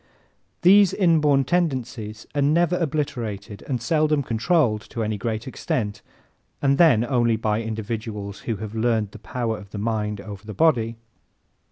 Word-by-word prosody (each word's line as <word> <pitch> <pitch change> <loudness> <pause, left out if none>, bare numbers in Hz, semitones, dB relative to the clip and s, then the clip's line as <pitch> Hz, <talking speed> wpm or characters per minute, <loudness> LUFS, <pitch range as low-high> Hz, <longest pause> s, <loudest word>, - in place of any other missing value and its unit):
These 195 +1 +6
inborn 150 -7 +3
tendencies 125 -9 -2
are 145 - 0
never 165 +5 +3
obliterated 120 - -3
and 130 -3 -1
seldom 150 +3 +1
controlled 115 -1 +1
to 115 - -3
any 110 0 -1
great 110 +3 -3
extent, 105 -5 -3 0.6
and 140 0 +2
then 140 -10 +5
only 120 -3 +2
by 110 0 0
individuals 110 -2 -5
who 115 - -3
have 105 +1 -7
learned 110 -2 0
the 110 - -11
power 115 0 -3
of 100 - -13
the 105 - -7
mind 105 -1 -2
over 100 -2 -9
the 110 0 -8
body. 120 -8 +2
115 Hz, 150 wpm, -23 LUFS, 110-145 Hz, 0.6 s, These